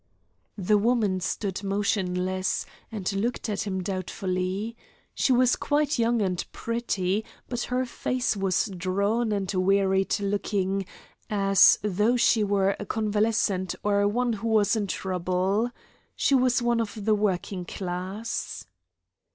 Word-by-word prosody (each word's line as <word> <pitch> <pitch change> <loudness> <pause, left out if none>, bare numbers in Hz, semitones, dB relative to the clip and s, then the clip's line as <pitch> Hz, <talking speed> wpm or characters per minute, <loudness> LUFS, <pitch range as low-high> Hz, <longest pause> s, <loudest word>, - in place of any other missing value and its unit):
The 205 +2 +3
woman 215 -4 +2
stood 190 +1 -3
motionless, 185 -2 0 0.3
and 205 -2 -3
looked 225 +3 -2
at 205 0 -2
him 190 -2 -2
doubtfully. 185 +3 -3 0.4
She - - +1
was 250 0 +4
quite 290 -1 0
young 230 -1 +2
and 180 -2 -1
pretty, 220 -4 -1 0.2
but 245 -1 -3
her 255 +1 0
face 250 -1 -1
was 195 0 +1
drawn 200 +6 0
and 195 -2 -1
wearied 190 +1 +2
looking, 195 -1 -1 0.4
as 195 -2 +5
though 210 +4 +2
she 230 -2 +4
were 200 -1 +2
a 205 - -5
convalescent 210 -3 0
or 205 0 +2
one 240 +3 +1
who 225 +2 -4
was 220 -1 +3
in 210 -2 -1
trouble. 185 +4 0 0.5
She - - +1
was 250 -2 +3
of 230 -3 -1
the 220 - +4
working 195 -2 -1
class. 185 +5 -4
205 Hz, 125 wpm, -26 LUFS, 190-225 Hz, 0.5 s, as